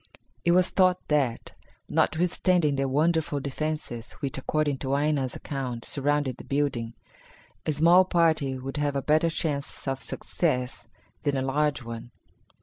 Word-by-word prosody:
It 170 - +4
was 180 0 +3
thought 185 -1 +4
that, 135 -6 0 0.3
notwithstanding 175 -2 +2
the 135 0 0
wonderful 155 +1 +1
defences, 140 -4 -4
which, 140 -3 -4
according 145 0 0
to 135 +1 -1
Aina's 145 -4 0
account 125 -5 -4
surrounded 145 -1 0
the - - -10
building, 130 -5 -1 0.7
a - - +3
small 170 +5 +6
party 160 -7 +2
would 135 +2 -6
have 145 -1 0
a 140 - -1
better 155 +2 +3
chance 145 -4 -3
of 135 -1 -1
success 125 -7 -2 0.3
than 140 -1 0
a 130 - 0
large 140 0 0
one. 115 0 -7
145 Hz, 145 wpm, -27 LUFS, 135-155 Hz, 0.7 s, small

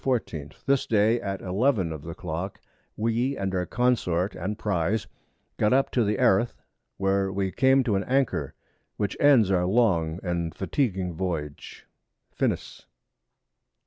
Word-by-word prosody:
14._ 85 - -2
This 140 -1 +2
Day 110 +2 +3
at 100 -3 -4
11 95 -1 +1
of 80 - -7
the 80 +2 -7
Clock, 85 +5 -5 0.4
we 115 +5 0
and 95 -1 -2
our 90 -1 -1
Consort 105 -7 +1
and 95 +6 -4
Prize 100 0 0 0.5
got 105 +3 +3
up 135 +1 +2
to - - 0
Eriff 105 -1 0
[Erith], 100 +6 +3 0.4
where 95 0 +1
we 95 0 -1
came 130 +3 +4
to 110 -5 0
an 95 - 0
Anchor, 135 0 0 0.4
which 105 - -1
ends 130 -9 +5
our 90 -1 +2
long 90 -7 +2
and 85 -2 -2
fatiguing 95 -4 -1
Voyage. 80 -4 -5 0.5
_FINIS. - - -2
100 Hz, 145 wpm, -26 LUFS, 90-120 Hz, 0.5 s, ends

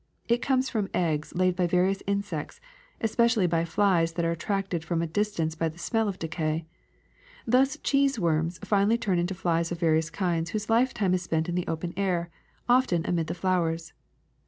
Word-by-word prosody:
It 235 +1 +2
comes 265 -1 +1
from 210 -5 -2
eggs 155 -4 -1
laid 185 0 +2
by 180 -1 +1
various 185 +3 +1
insects, 200 -6 -3 0.4
especially 230 -2 +2
by 165 -1 +1
flies 170 -2 +2
that 170 0 -1
are 165 - +1
at 170 - -4
tracted 195 -4 -2
from 170 0 -1
a - - 0
distance 165 -2 -1
by 165 0 -1
the 160 - -13
smell 225 +4 0
of 195 -2 -3
decay. 160 -1 -2 0.8
Thus 260 +3 +3
cheese 275 -2 +2
worms 165 -2 0
finally 205 +2 +3
turn 195 -6 0
into 175 +2 -1
flies 170 -2 0
of 170 - -4
various 160 -1 +2
kinds 170 -3 -1
whose 215 +3 -3
lifetime 225 -5 +2
is 185 - +1
spent 165 -1 -1
in - - -2
the 180 0 -2
open 165 +1 -3
air, 175 -3 -1 0.4
often 245 -10 +3
amid 165 -3 0
the - - -3
flowers. 170 -3 -1
180 Hz, 185 wpm, -27 LUFS, 165-205 Hz, 0.8 s, Thus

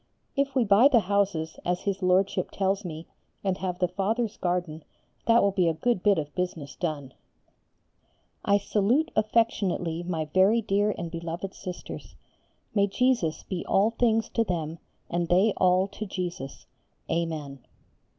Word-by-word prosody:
If 275 -1 0
we 255 - +4
buy 210 +5 +6
the 245 -5 +4
houses, 190 -5 0
as 180 0 -1
his 200 -1 -2
Lordship 185 +2 +2
tells 195 +1 0
me, 165 -2 -6 0.4
and 190 -2 -1
have 180 -1 -2
the 180 -1 +1
Fathers' 210 +5 -1
garden, 175 -3 -2 0.4
that 230 0 +5
will 200 - +3
be 185 -3 +2
a 165 - +1
good 235 +3 0
bit 200 -1 +4
of 150 -2 -3
business 165 -6 -4
done. 145 -6 -4 1.3
I 200 - +4
salute 225 +10 +1
affectionately 200 -7 +1
my 170 -3 -2
very 195 +5 +5
dear 205 -1 +1
and 170 -1 -5
beloved 170 +3 -5
Sisters. 180 -1 -8 0.6
May 200 -1 +3
Jesus 230 -6 +1
be 185 -3 -4
all 205 +4 +3
things 225 -1 +2
to 230 - +1
them, 165 -5 -3 0.3
and 175 0 -1
they 190 +5 +4
all 185 +1 +3
to 215 +2 -6
Jesus. 175 -8 -5 0.4
Amen. 160 -4 -3
185 Hz, 150 wpm, -27 LUFS, 170-205 Hz, 1.3 s, buy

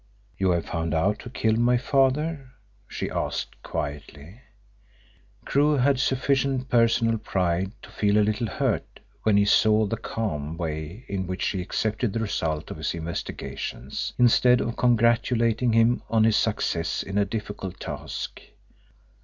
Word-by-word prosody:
"You 95 +2 +1
have 85 -2 +1
found 80 -1 -2
out 100 +6 +1
who - - -9
killed 110 -2 +1
my 120 +1 +4
father?" 135 +2 0 0.3
she - - -4
asked - - -3
quietly. 75 - -6 1.0
Crewe 145 +1 +3
had 135 0 +3
sufficient 135 0 +1
personal 115 -1 +3
pride 95 -1 -1
to - - -12
feel 105 0 +2
a 105 - +4
little 110 +2 -1
hurt - - -2 0.2
when 105 -2 +3
he 100 - +4
saw 110 +1 +4
the 115 +3 -2
calm 80 -10 -4
way 80 +6 -5
in 95 -2 -3
which 90 +1 -3
she 95 - -1
accepted 110 +4 -1
the 115 - -1
result 80 -8 -2
of - - -6
his - - -2
investigations, 80 -5 -5
instead 125 0 +5
of 115 - -2
congratulating 115 0 +2
him 115 +2 +3
on 110 -1 +3
his 110 -1 +4
success 100 -7 0
in 100 +1 -2
a - - +4
difficult 100 -3 -5
task. - - -6
110 Hz, 145 wpm, -25 LUFS, 90-120 Hz, 1.0 s, instead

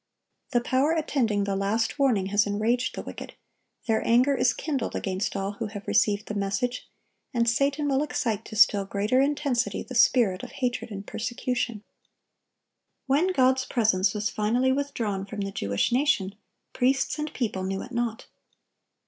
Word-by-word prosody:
The 240 -4 +2
power 265 +6 +2
attending 250 -10 0
the 200 -1 -1
last 220 +6 -1
warning 240 -9 +3
has 205 +1 +3
enraged 225 +5 0
the - - -5
wicked; - - -9 0.5
their 220 -2 +1
anger 250 +4 +4
is 255 -2 +3
kindled 280 -7 -3
against 190 0 -2
all 195 0 -2
who 215 +2 -5
have 205 -1 -9
received 210 -2 +2
the - - -5
message, 200 +5 -2 0.5
and 235 0 +2
Satan 280 +5 +1
will 275 -1 +2
excite 225 -7 -1
to - - -9
still 210 -1 +5
greater 205 +6 +1
intensity 275 -3 0
the 255 - -9
spirit 235 -6 +4
of - - -9
hatred 245 -3 -2
and 200 -2 -7
persecution. 235 -1 -3 1.2
When 285 +7 +2
God's 260 -4 +3
presence 210 -5 +2
was 210 0 -1
finally 240 +5 +1
withdrawn 240 -8 -2
from 205 +1 -6
the 195 0 -3
Jewish 100 - -1
nation, 240 -7 +1 0.4
priests 265 +4 +1
and 300 0 -3
people 210 -6 -2
knew 190 +1 -3
it 250 - -11
not. 235 -1 -2
235 Hz, 160 wpm, -26 LUFS, 205-260 Hz, 1.2 s, still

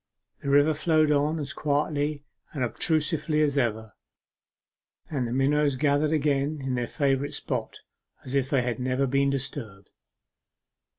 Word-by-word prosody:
The 140 - -3
river 145 +2 +5
flowed 155 0 +2
on 150 +2 +2
as 145 -3 -4
quietly 145 0 -1 0.3
and 140 -5 -2
obtusely 155 - 0
as 145 -2 +1
ever, 110 -5 -1 1.2
and 130 -5 -1
the - - -5
minnows 140 +2 +2
gathered 145 +2 +2
again 150 -1 +1
in 135 -1 -3
their 120 -1 -1
favourite 140 0 0
spot - - -4 0.4
as 130 - -6
if 135 -1 +1
they 135 -5 +2
had 120 -1 -2
never 130 +2 0
been 140 +1 +2
disturbed. 120 -7 -5
140 Hz, 140 wpm, -26 LUFS, 130-150 Hz, 1.2 s, river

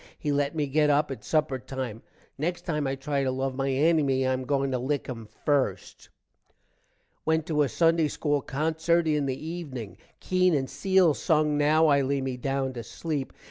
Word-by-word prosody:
he 150 - -2
let 145 +1 0
me 150 -2 0
get 150 +2 +2
up 145 0 +2
at 135 - -7
supper 150 -4 0
time. 130 -3 -6 0.3
next 175 +5 -2
time 150 -4 -1
i 135 - -1
try 140 +1 -2
to 130 - 0
love 130 +1 -2
my 135 +1 -1
ennymy 135 -2 +2
i 130 - +2
am 130 - -2
a - - -7
going 140 0 0
to 130 - 0
lick 140 +3 -1
him 115 -4 -7 0.2
first. 130 -11 -1 1.1
Went 160 -1 +1
to 150 -2 +1
a 140 - +2
sunday 165 +5 +3
school 145 -1 -1
concert 160 +4 0
in 150 -2 +1
the 135 +3 -4
evening. 135 - -6 0.2
Keene 185 -2 +2
and 135 -2 0
Cele 180 +3 +3
sung 155 0 +1
now 150 +2 +4
i 140 -2 +4
lay 140 +1 0
me 130 -1 -3
down 135 +1 -2
to 120 -2 -6
sleep. 145 +2 -4
145 Hz, 195 wpm, -27 LUFS, 130-155 Hz, 1.1 s, now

